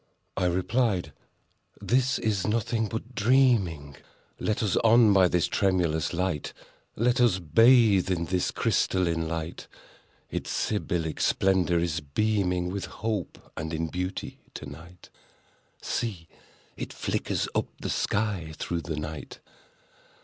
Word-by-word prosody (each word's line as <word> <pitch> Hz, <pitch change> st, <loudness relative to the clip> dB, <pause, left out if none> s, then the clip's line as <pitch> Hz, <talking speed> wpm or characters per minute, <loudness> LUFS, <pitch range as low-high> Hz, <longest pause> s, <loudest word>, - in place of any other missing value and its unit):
I 90 Hz, -, 0 dB
replied—"This 115 Hz, +5 st, -1 dB
is 105 Hz, -4 st, -1 dB
nothing 115 Hz, +1 st, 0 dB
but 115 Hz, +4 st, -6 dB
dreaming. 110 Hz, -, +2 dB, 0.4 s
Let 110 Hz, +1 st, -1 dB
us 105 Hz, -, +1 dB
on, 115 Hz, -2 st, +6 dB
by 95 Hz, -2 st, +6 dB
this 90 Hz, -1 st, +1 dB
tremulous 90 Hz, -6 st, +1 dB
light! 90 Hz, -3 st, -2 dB, 0.4 s
Let 125 Hz, +3 st, +2 dB
us 120 Hz, -7 st, +4 dB
bathe 100 Hz, -, +5 dB
in 85 Hz, -2 st, 0 dB
this 90 Hz, +1 st, 0 dB
crystalline 85 Hz, -3 st, 0 dB
light! 80 Hz, +1 st, -5 dB, 0.6 s
Its -, -, -4 dB
Sybillic 85 Hz, -6 st, -2 dB
splendor 95 Hz, -2 st, +2 dB
is 85 Hz, -1 st, 0 dB
beaming 90 Hz, +3 st, 0 dB
With 100 Hz, 0 st, -3 dB
Hope 110 Hz, -6 st, -5 dB
and 80 Hz, 0 st, -4 dB
in 80 Hz, 0 st, -2 dB
Beauty 90 Hz, +2 st, -4 dB, 0.2 s
to -, -, -7 dB
night— 85 Hz, +5 st, -12 dB, 0.7 s
See!—it 100 Hz, -9 st, -6 dB
flickers -, -, -2 dB
up -, -, 0 dB
the -, -, -3 dB
sky 100 Hz, -7 st, -1 dB
through 85 Hz, -1 st, -3 dB
the 80 Hz, -2 st, -5 dB
night! 75 Hz, 0 st, -6 dB
95 Hz, 120 wpm, -27 LUFS, 85-110 Hz, 0.7 s, on